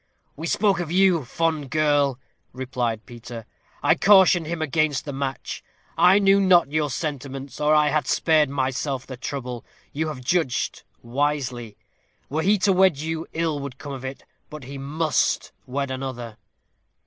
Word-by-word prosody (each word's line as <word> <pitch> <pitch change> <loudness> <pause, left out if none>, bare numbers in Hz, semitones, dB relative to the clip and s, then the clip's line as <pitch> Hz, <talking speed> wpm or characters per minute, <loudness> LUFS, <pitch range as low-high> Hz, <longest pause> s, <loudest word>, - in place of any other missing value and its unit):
"We 160 +3 -5
spoke 195 0 +2
of 170 -2 -4
you, 180 -4 +4
fond 155 +1 -1
girl," 145 -3 +2 0.4
replied 125 -4 -3
Peter. 120 -2 -9 0.4
"I - - +5
cautioned 190 -4 +5
him 170 0 -3
against 155 -1 0
the 145 - -5
match. 135 -1 -4 0.3
I 185 +2 +6
knew 200 -1 +4
not 175 -7 +4
your 150 -1 0
sentiments, 135 -2 -5
or 150 +1 +4
I 150 -1 +4
had 155 +1 0
spared 155 -3 +3
myself 130 0 -2
the 130 - -7
trouble. 125 -2 -5 0.3
You 155 +2 -1
have 135 -5 -6
judged 145 -4 0 0.2
wisely. 125 -3 -2 0.5
Were 155 +2 0
he 200 +5 +3
to 195 - +4
wed 185 -4 +4
you, 160 +2 -4
ill 160 -3 -1
would 140 -2 -7
come 140 +1 -7
of 135 -1 -7
it. 130 0 -6 0.3
But 150 -2 -9
he 135 +2 -8
must 155 +3 0 0.2
wed 135 +1 -2
another." 125 -4 -5
145 Hz, 160 wpm, -24 LUFS, 130-160 Hz, 0.5 s, I